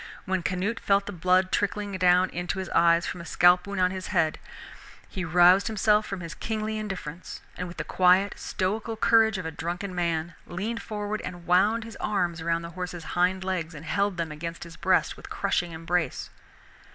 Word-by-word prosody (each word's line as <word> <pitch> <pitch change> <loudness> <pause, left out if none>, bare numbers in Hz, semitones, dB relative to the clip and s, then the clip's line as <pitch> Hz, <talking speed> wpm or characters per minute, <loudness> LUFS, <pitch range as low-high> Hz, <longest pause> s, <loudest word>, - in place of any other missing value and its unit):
When 190 -1 0
Canute 185 +6 -2
felt 200 0 +2
the - - -5
blood 185 +1 +2
trickling 205 -1 -1
down 180 0 +4
into 175 +2 -3
his 190 -2 -4
eyes 170 0 +4
from 180 - -5
a - - -8
scalp 180 +2 +4
wound 200 -1 -4
in 180 0 +3
his 185 0 -5
head, 170 -5 +1 0.7
he 185 - -5
roused 175 +3 +5
himself 215 -1 +2
from 195 -2 -5
his 165 0 -6
kingly 215 -1 -3
indifference, 185 -5 -6
and 180 - -4
with 175 - -10
the - - -2
quiet 185 +2 +3
stoical 215 +4 -3
courage 220 -1 +4
of 185 - -5
a 160 - -3
drunken 175 +5 -4
man 170 -1 -1
leaned 215 +7 -4
forward 210 0 -4
and 175 -2 -8
wound 205 +6 +3
his 225 0 -10
arms 175 -5 -1
about 165 0 0
the 170 - -7
horse's 175 -1 -6
hind 185 +1 +1
legs 180 -3 -3
and 150 +2 -9
held 200 +2 0
them 165 -2 -2
against 165 +2 -6
his 170 -1 -11
breast 185 +1 +1
with - - -12
crushing 175 -1 -1
embrace. 165 +1 -2
180 Hz, 190 wpm, -26 LUFS, 170-200 Hz, 0.7 s, roused